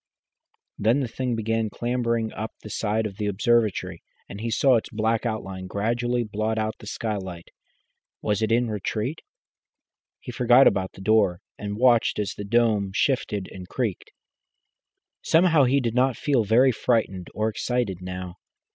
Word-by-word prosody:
Then 115 +7 +3
the 130 - -1
thing 125 +1 -2
began 115 0 -1
clambering 115 -1 -1
up 110 +1 -5
the 105 - -8
side 110 +1 -1
of 100 -2 -5
the 105 - -2
observatory, 100 -4 +1 0.3
and 100 - -8
he 115 - -2
saw 130 +3 +4
its 110 - -4
black 110 +2 0
outline 95 -4 -5
gradually 120 +5 -1
blot 110 +1 -2
out 110 0 -1
the 105 - -11
skylight. 95 -6 -5 0.7
Was 105 0 -1
it 110 0 0
in 120 +1 +3
retreat? 110 - -3 1.0
He 125 - -8
forgot 125 +2 +5
about 95 -1 +2
the - - -12
door, 100 -4 +3 0.2
and 105 0 -5
watched 120 -1 +3
as 105 -2 -2
the 105 - -7
dome 105 -2 +2
shifted 105 -8 0
and 90 -1 -10
creaked. 115 -8 -3 1.1
Somehow 165 -4 +4
he 135 +3 +3
did 120 -4 -1
not 130 0 +2
feel 135 -6 +1
very 125 +5 +5
frightened 110 -6 0
or 110 +1 0
excited 110 -4 -2
now. 90 0 -6
110 Hz, 155 wpm, -25 LUFS, 100-120 Hz, 1.1 s, forgot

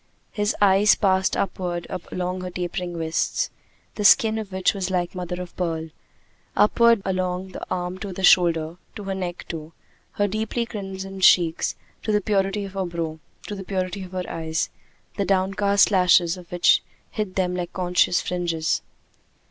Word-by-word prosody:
His 210 0 0
eyes 205 +1 +5
passed 190 -2 +2
upward 175 -2 -2 0.3
along 180 0 -2
her 180 - -4
tapering 175 0 -4
wrists, 165 - -1 0.4
the 210 - -4
skin 220 +1 +5
of 210 -3 -7
which 190 -1 +1
was 195 -2 -3
like 180 -2 -1
mother 180 -1 -4
of 180 -1 -8
pearl; 165 -2 -2 0.7
upward 230 0 +5
along 185 0 -1
the - - -8
arm 180 0 -3
to 200 -1 -5
the 190 +1 -6
shoulder 170 -2 +4 0.2
to 210 - -7
her 195 0 -3
neck 180 -2 -5
to 160 -1 -6 0.4
her 205 - +1
deeply 220 +3 -2
crimsoned 195 -3 -6
cheeks 170 -3 +4 0.3
to 215 - -2
the 210 - +3
purity 200 0 0
of 195 - -9
her 195 -1 -1
brow 165 -2 -4 0.3
to 210 - -5
the 195 -1 -6
purity 185 0 -3
of 185 0 -11
her 185 -1 -3
eyes, 160 -1 -2 0.5
the 200 - +1
downcast 195 +2 +3
lashes 180 -2 +4
of 180 -2 -13
which 175 -1 +4 0.3
hid 210 -3 -3
them 180 -1 0
like 175 -1 -3
conscious 180 -1 +2
fringes. 170 -3 -1
185 Hz, 165 wpm, -24 LUFS, 175-195 Hz, 0.7 s, eyes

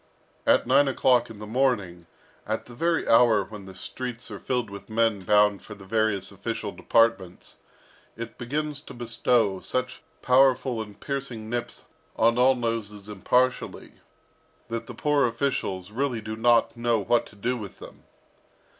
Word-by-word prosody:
At - - +4
nine 140 +3 +4
o'clock 125 -2 +3
in 110 - -10
the 105 - -8
morning, 105 -8 0 0.4
at 110 +1 -2
the 120 - -13
very 165 +6 0
hour 115 -3 +5
when 105 -1 -10
the 95 - -11
streets 125 +5 -7
are - - -6
filled 125 -5 -2
with 100 +2 -10
men 110 -2 +1
bound 105 +1 +3
for 105 - -10
the 100 -1 -13
various 105 -2 0
official 105 +1 -4
departments, 115 -7 0 0.6
it 115 0 -7
begins 145 +4 -2
to - - -11
bestow 115 -4 +1
such 130 +4 -3 0.2
powerful 130 -2 +3
and 105 -2 -10
piercing 130 -6 -5
nips 120 0 -4 0.3
on 115 +2 +3
all 130 +1 +5
noses 110 -4 -3
impartially, 125 +5 0 0.8
that 115 0 -4
the - - -8
poor 145 -3 +2
officials 115 -7 -2
really 125 0 -1
do 110 0 -6
not 115 +1 +3
know 120 -1 +1
what 115 +3 +1
to - - -17
do 120 +5 -1
with 105 -6 -8
them. - - -13
115 Hz, 155 wpm, -26 LUFS, 105-125 Hz, 0.8 s, hour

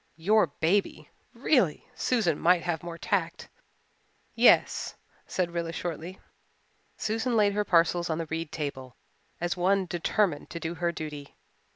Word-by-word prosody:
Your 210 +6 +3
baby! 190 +5 -1 0.2
Really, - - +2
Susan 210 - 0
might 175 0 +4
have 170 -2 -2
more 170 -1 -7
tact. 180 -2 -2 0.8
"Yes," - - +4 0.3
said 180 -2 -1
Rilla 170 -1 -3
shortly. 170 +2 -5 0.8
Susan 225 +2 -1
laid 205 -1 +4
her 210 +1 +1
parcels 170 -1 +2
on 160 - 0
the 165 - -3
reed 160 0 -4
table, 135 -4 -5 0.4
as 175 0 -1
one 190 +2 +2
determined 175 -1 0
to 170 - -6
do 165 0 -3
her 170 0 -1
duty. 150 -3 -7
170 Hz, 140 wpm, -28 LUFS, 165-190 Hz, 0.8 s, might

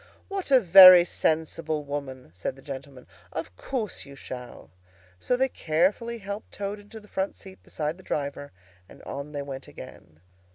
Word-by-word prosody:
"What 390 -4 -4
a 265 -2 +7
very 185 -3 +10
sensible 160 -2 -1
woman!" 140 - -6
said 90 +7 -4
the 135 - -17
gentleman. 135 -2 -9 0.3
"Of 90 - -6
course 225 - -4
you 140 -1 -13
shall." 125 - -9 0.5
So 250 - 0
they 265 +1 +2
carefully 200 +5 0
helped 200 0 -7
Toad 205 +1 -4
into 205 +2 -12
the 210 - -18
front 190 -1 -3
seat 190 -1 -13
beside 155 +2 -4
the - - -14
driver, 145 -2 -4 0.4
and - - -15
on 140 +2 -7
they 145 -1 -4
went 135 -1 -8
again. 80 0 -13
160 Hz, 165 wpm, -26 LUFS, 140-200 Hz, 0.5 s, very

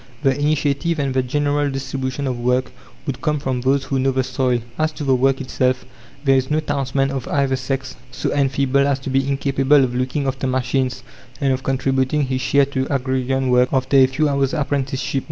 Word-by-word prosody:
The 135 -2 +3
initiative 150 +2 0
and 140 -3 -1
the 130 - +2
general 145 +2 0
distribution 135 0 -3
of 125 -2 -2
work 125 +2 0 0.3
would 135 -4 -4
come 150 -2 0
from 130 -3 -2
those 135 +2 +2
who 135 0 -1
know 135 +1 +2
the 130 0 +1
soil. 125 -2 0 0.2
As 155 0 +1
to 150 - -6
the 135 -2 +2
work 135 +1 +2
itself, 130 -1 -1 0.4
there 135 -2 +4
is 130 0 +1
no 155 +1 +2
townsman 140 -2 -1
of 135 -3 -4
either 140 -2 +1
sex 130 0 -4
so 125 - -3
enfeebled 140 0 +2
as 140 -2 +1
to 135 - -4
be 135 0 +1
incapable 135 0 +3
of 125 -1 -1
looking 130 +3 -1
after 135 0 -2
machines 130 0 -1 0.4
and 135 -1 +2
of 130 - -2
contributing 135 +2 0
his 130 -1 -2
share 140 +2 +3
to 135 -1 -2
agrarian 130 -1 0
work 125 0 +4
after 130 0 +1
a 135 -1 +7
few 135 +4 0
hours' 140 +1 0
apprenticeship. 140 -2 -1
135 Hz, 200 wpm, -20 LUFS, 130-140 Hz, 0.4 s, a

